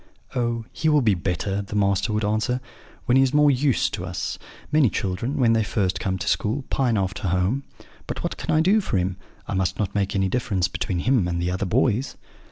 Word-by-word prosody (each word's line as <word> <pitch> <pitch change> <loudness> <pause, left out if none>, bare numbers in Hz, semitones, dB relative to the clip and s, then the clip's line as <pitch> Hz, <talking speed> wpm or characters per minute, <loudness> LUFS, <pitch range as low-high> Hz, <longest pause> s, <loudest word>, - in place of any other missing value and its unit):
'Oh, 120 -2 -1
he 160 - 0
will 150 -3 +4
be 110 -3 +4
better,' 95 +2 -2
the 100 +1 -7
master 100 +2 +1
would 105 0 0
answer, 110 +4 0 0.5
'when 125 +1 +4
he - - +6
is 135 +1 +2
more 150 -1 +6
used 135 -1 +1
to - - -3
us. - - -4 0.3
Many 150 -5 +4
children, 100 - -2
when 120 -4 +4
they 115 -1 +2
first 100 -2 -1
come 95 -1 -1
to 100 +2 -5
school, 115 +8 0
pine 125 -5 +2
after 95 +1 -2
home; 90 +10 0 0.4
but - - -4
what - - -2
can - - -8
I 155 - +4
do 200 +6 +4
for 115 - -1
him? 90 0 -1 0.3
I - - -3
must 95 0 0
not 100 -2 -2
make 100 0 -1
any 95 -1 +2
difference 95 -4 0
between 90 -1 -2
him 125 -6 +2
and 85 -1 -1
the 90 +1 -1
other 95 +2 -2
boys.' 125 +4 +1
105 Hz, 220 wpm, -24 LUFS, 95-130 Hz, 0.5 s, he